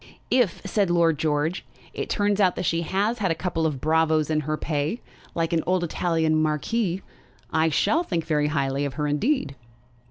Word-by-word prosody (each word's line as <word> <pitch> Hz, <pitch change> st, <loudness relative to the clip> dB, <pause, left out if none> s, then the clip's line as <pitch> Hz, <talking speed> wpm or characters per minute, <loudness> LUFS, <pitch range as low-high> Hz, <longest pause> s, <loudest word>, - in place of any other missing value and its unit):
"If," 245 Hz, -8 st, +2 dB
said 195 Hz, -1 st, +1 dB
Lord 165 Hz, -3 st, +3 dB
George, 155 Hz, +3 st, 0 dB, 0.3 s
"it -, -, -4 dB
turns 205 Hz, -1 st, +1 dB
out 185 Hz, -3 st, +3 dB
that 180 Hz, -, -3 dB
she 165 Hz, 0 st, +1 dB
has 200 Hz, +7 st, 0 dB
had 195 Hz, -3 st, +1 dB
a 165 Hz, -, +1 dB
couple 165 Hz, -2 st, -1 dB
of 145 Hz, -4 st, -3 dB
bravos 160 Hz, +1 st, +2 dB
in 155 Hz, -, +2 dB
her 155 Hz, +1 st, -2 dB
pay, 155 Hz, +8 st, -2 dB, 0.4 s
like 165 Hz, 0 st, 0 dB
an 165 Hz, -, +2 dB
old 180 Hz, 0 st, +2 dB
Italian 160 Hz, -2 st, +1 dB
marquis, 175 Hz, +5 st, -1 dB, 0.5 s
I 160 Hz, +1 st, +3 dB
shall 305 Hz, -, +2 dB
think 170 Hz, -, -2 dB
very 150 Hz, -2 st, +1 dB
highly 140 Hz, -2 st, -1 dB
of 140 Hz, -2 st, -3 dB
her 150 Hz, 0 st, -1 dB
indeed." 150 Hz, -, 0 dB
165 Hz, 185 wpm, -25 LUFS, 155-185 Hz, 0.5 s, Lord